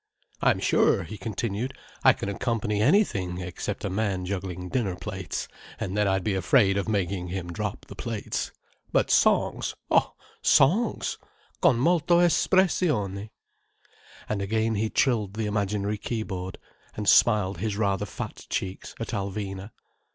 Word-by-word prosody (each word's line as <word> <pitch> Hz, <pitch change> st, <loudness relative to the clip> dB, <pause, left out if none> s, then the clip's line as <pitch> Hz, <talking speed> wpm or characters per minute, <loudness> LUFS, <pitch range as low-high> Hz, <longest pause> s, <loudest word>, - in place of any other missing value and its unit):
"I'm -, -, +3 dB
sure," -, -, +3 dB
he 110 Hz, -, -8 dB
continued, 110 Hz, +4 st, -3 dB, 0.3 s
"I -, -, +8 dB
can -, -, -5 dB
accompany 105 Hz, 0 st, -1 dB
anything 105 Hz, -, +2 dB
except 90 Hz, -1 st, -4 dB
a -, -, -1 dB
man 95 Hz, -2 st, -1 dB
juggling 90 Hz, -1 st, -4 dB
dinner 100 Hz, -3 st, -1 dB
plates—and 95 Hz, 0 st, -6 dB
then 105 Hz, -1 st, +2 dB
I'd 95 Hz, -1 st, +1 dB
be 105 Hz, -, 0 dB
afraid 95 Hz, +2 st, +3 dB
of 100 Hz, +2 st, -1 dB
making 95 Hz, -3 st, -1 dB
him 85 Hz, -1 st, -4 dB
drop -, -, -4 dB
the -, -, -10 dB
plates. 115 Hz, -3 st, -3 dB, 0.4 s
But -, -, +2 dB
songs—oh, -, -, +2 dB, 0.3 s
songs! 200 Hz, -, +3 dB, 0.4 s
Con 115 Hz, -, +5 dB
molto 170 Hz, +3 st, +3 dB
espressione!" 160 Hz, -, +2 dB, 1.0 s
And 105 Hz, -2 st, -2 dB
again 110 Hz, +3 st, 0 dB
he 110 Hz, +1 st, 0 dB
trilled 105 Hz, -7 st, +1 dB
the 110 Hz, 0 st, -1 dB
imaginary 105 Hz, 0 st, -1 dB
keyboard, 95 Hz, -6 st, -4 dB, 0.4 s
and 105 Hz, -1 st, -3 dB
smiled 100 Hz, -7 st, +4 dB
his 105 Hz, 0 st, -2 dB
rather 100 Hz, -3 st, 0 dB
fat -, -, -7 dB
cheeks 95 Hz, 0 st, -4 dB
at -, -, -4 dB
Alvina. 100 Hz, 0 st, -4 dB
100 Hz, 135 wpm, -26 LUFS, 95-110 Hz, 1.0 s, I